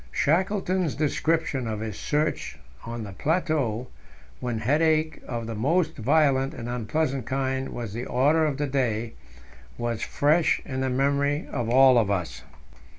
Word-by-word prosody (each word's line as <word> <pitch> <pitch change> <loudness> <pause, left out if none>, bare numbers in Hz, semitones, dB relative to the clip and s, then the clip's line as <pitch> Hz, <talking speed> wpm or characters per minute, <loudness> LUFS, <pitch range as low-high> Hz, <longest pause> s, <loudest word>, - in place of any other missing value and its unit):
Shackleton's 185 0 +1
description 155 -3 0
of 110 -1 -3
his 110 -2 -6
march 150 +1 0 0.3
on 115 0 -5
the 100 - -7
plateau, 145 - 0 0.5
when 120 -2 -2
headache 155 +6 +1
of 115 -2 -4
the 115 - -4
most 155 +11 +1
violent 135 +2 +2
and 120 - -6
unpleasant 130 +2 -2
kind 130 0 -1
was 115 -4 -6
the 120 +3 -4
order 145 +6 +3
of 150 -3 0
the 145 - 0
day, 120 -5 -1 0.6
was 120 -2 -2
fresh 155 +3 +2
in 130 -1 -3
the 130 - 0
memory 140 +3 +1
of 120 -4 -2
all 130 0 +6
of 105 -4 +1
us. 85 -10 -2
135 Hz, 150 wpm, -26 LUFS, 115-155 Hz, 0.6 s, all